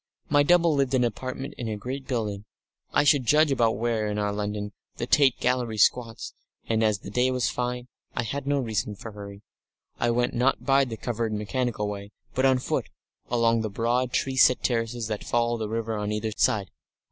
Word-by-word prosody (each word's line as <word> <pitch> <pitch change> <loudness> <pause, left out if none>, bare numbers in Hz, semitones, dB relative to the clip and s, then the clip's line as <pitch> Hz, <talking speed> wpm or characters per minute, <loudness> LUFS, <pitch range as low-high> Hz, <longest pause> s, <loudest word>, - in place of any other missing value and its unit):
My 145 0 +5
double 170 +1 +4
lived 135 -2 +1
in 125 - +3
an - - +4
apartment 130 +5 -6
in 120 - -3
a 110 -1 -3
great 130 +5 -6
building 105 -5 -2 0.5
I 145 - +3
should 145 -2 +4
judge 150 +2 +5
about 115 -4 +2
where, 115 -2 0
in 105 0 -2
our 105 -1 0
London, 105 0 -3 0.3
the - - -2
Tate 135 -4 +4
Gallery 125 -3 0
squats, 115 +2 +1 0.3
and, 110 -1 +1
as 105 -2 +1
the 100 - -8
day 125 +4 +2
was 125 -1 0
fine, 125 0 -2
and 120 - -18 0.3
I - - 0
had 140 +4 -4
no 145 0 +2
reason 110 -4 -2
for 110 +3 -9
hurry, 100 -1 -10 0.6
I 120 - +2
went 120 +1 +1
not 125 +2 +1
by 135 0 +4
the 115 -3 -6
covered 115 -1 -2
mechanical 105 0 -2
way, 100 0 -6 0.2
but 130 +1 +3
on 130 -1 +4
foot 125 - -2 0.4
along 115 -1 +2
the 110 - -2
broad, 120 +4 0
tree 130 +1 -1
set 125 -1 +5
terraces 115 -1 -1
that 105 -1 -4
follow 120 0 0
the 110 -1 -3
river 115 0 -2
on 105 0 -2
either 105 +1 -2
side. 100 -3 +1
120 Hz, 205 wpm, -26 LUFS, 105-130 Hz, 0.6 s, My